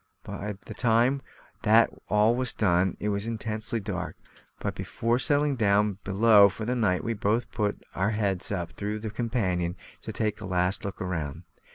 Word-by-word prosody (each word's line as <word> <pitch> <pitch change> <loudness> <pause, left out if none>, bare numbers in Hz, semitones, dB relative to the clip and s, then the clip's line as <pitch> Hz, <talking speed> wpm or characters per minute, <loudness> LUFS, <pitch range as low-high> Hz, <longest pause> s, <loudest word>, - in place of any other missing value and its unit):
By 105 +1 -5
the 110 - -7
time 120 +4 +2 0.4
that 110 +2 +5 0.2
all 105 +2 +4
was 125 0 -2
done 90 -2 +2
it 105 - -1
was 100 +1 -2
intensely 110 0 -2
dark; 100 - -4 0.4
but, - - -2
before 115 +2 -1
settling 145 +1 +2
down 105 -3 +2
below 100 +1 +6
for 110 +3 -6
the 125 +2 0
night, 100 -7 +1
we 115 - -1
both 110 +3 0
put 105 -2 -2
our 95 +3 +1
heads 100 -4 -1
up 85 -4 -3
through 105 +1 -4
the 110 0 -5
companion 100 -7 -1 0.3
to - - -6
take 105 -1 -2
a - - -5
last 90 +3 0
look 100 -2 -5
round. 80 -6 -3
105 Hz, 175 wpm, -27 LUFS, 95-115 Hz, 0.4 s, below